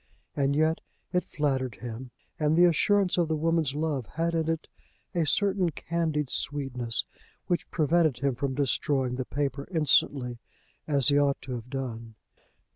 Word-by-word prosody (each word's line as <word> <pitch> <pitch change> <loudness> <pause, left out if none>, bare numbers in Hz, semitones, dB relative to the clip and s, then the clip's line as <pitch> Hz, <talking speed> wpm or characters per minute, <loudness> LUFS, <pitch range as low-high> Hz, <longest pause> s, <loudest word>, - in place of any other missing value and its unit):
And 140 0 +1
yet 155 +2 +2 0.3
it 180 - +1
flattered 135 - -1
him, 120 +3 -7 0.3
and 155 +1 +2
the 175 - +7
assurance 185 +2 +3
of 170 - +2
the 160 - 0
woman's 160 -2 +1
love 150 -6 -1
had 165 +1 0
in 165 -1 0
it 165 -1 -2 0.5
a 170 -4 +1
certain 195 +1 +2
candied 155 -3 -2
sweetness 125 -5 -1 0.4
which 175 - -1
prevented 155 -3 +2
him 140 +1 0
from 130 +2 -2
destroying 135 -1 +1
the 130 - -2
paper 140 0 -3
instantly, 140 -6 +2 0.5
as 140 -5 +4
he 145 0 +4
ought 140 -1 +2
to 130 - -5
have 120 0 -6
done. 115 -4 -5
145 Hz, 155 wpm, -28 LUFS, 130-165 Hz, 0.5 s, the